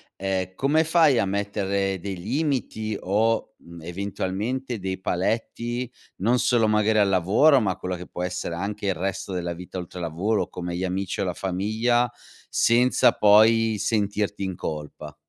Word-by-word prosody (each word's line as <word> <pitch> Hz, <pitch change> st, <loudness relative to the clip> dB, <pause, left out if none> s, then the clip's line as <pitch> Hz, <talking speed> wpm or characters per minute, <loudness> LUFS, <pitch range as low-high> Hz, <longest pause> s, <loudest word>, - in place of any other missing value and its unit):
ehm, 95 Hz, -1 st, -2 dB
come 150 Hz, +4 st, +2 dB
fai 160 Hz, -5 st, +4 dB
a 100 Hz, -, +2 dB
mettere 100 Hz, -1 st, -1 dB
dei 95 Hz, 0 st, -5 dB
limiti 115 Hz, -, -2 dB
o, 110 Hz, +3 st, 0 dB
mhmm, 85 Hz, -1 st, -13 dB
eventualmente, 100 Hz, +7 st, -3 dB
dei 95 Hz, 0 st, -4 dB
paletti 115 Hz, +6 st, -2 dB, 0.3 s
non 120 Hz, +6 st, +2 dB
solo 115 Hz, -3 st, +3 dB
magari 105 Hz, 0 st, +2 dB
al 100 Hz, -2 st, +4 dB
lavoro 100 Hz, -, +4 dB
ma 105 Hz, -5 st, +1 dB
a -, -, -6 dB
quello 90 Hz, 0 st, -4 dB
che 90 Hz, 0 st, -9 dB
può 90 Hz, -, -5 dB
essere 90 Hz, -1 st, -3 dB
anche 100 Hz, +2 st, -4 dB
il 95 Hz, -, +1 dB
resto 95 Hz, +3 st, -3 dB
della 85 Hz, -1 st, -3 dB
vita 90 Hz, +2 st, -9 dB
oltre 90 Hz, 0 st, -7 dB
lavoro 90 Hz, +6 st, -1 dB
come 90 Hz, -1 st, -5 dB
gli 90 Hz, -, -3 dB
amici 95 Hz, 0 st, -2 dB
o -, -, 0 dB
la -, -, -3 dB
famiglia, 110 Hz, +6 st, 0 dB, 0.4 s
senza 120 Hz, +2 st, +4 dB
poi 110 Hz, +1 st, +5 dB
sentirti 105 Hz, -1 st, -1 dB
in 95 Hz, -2 st, -3 dB
colpa? 75 Hz, -3 st, -6 dB
100 Hz, 160 wpm, -24 LUFS, 95-115 Hz, 0.4 s, poi